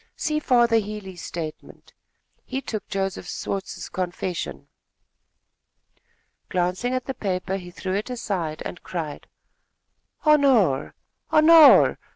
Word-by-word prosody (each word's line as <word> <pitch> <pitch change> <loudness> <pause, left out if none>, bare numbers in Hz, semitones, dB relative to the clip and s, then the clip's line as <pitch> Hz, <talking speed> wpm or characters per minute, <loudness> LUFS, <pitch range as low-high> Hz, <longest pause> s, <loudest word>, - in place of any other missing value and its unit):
See 305 -2 -1
Father 240 -5 +3
Healey's 205 -4 -5
statement. 160 -3 -8 0.5
He 265 - -4
took 225 -5 -6
Joseph 195 -2 -3
Swartz's 195 -1 -5
confession." 175 - -4 1.8
Glancing 185 +8 -1
at 255 - -3
the 265 - -3
paper, 190 -3 -2
he 180 -2 -9
threw 185 +1 -5
it 205 +5 -2
aside 195 -11 -3
and 175 - -7
cried: 160 -5 -6 1.0
"Honore! 265 - +3 0.3
Honore! 315 -1 +7
195 Hz, 105 wpm, -24 LUFS, 180-250 Hz, 1.8 s, Honore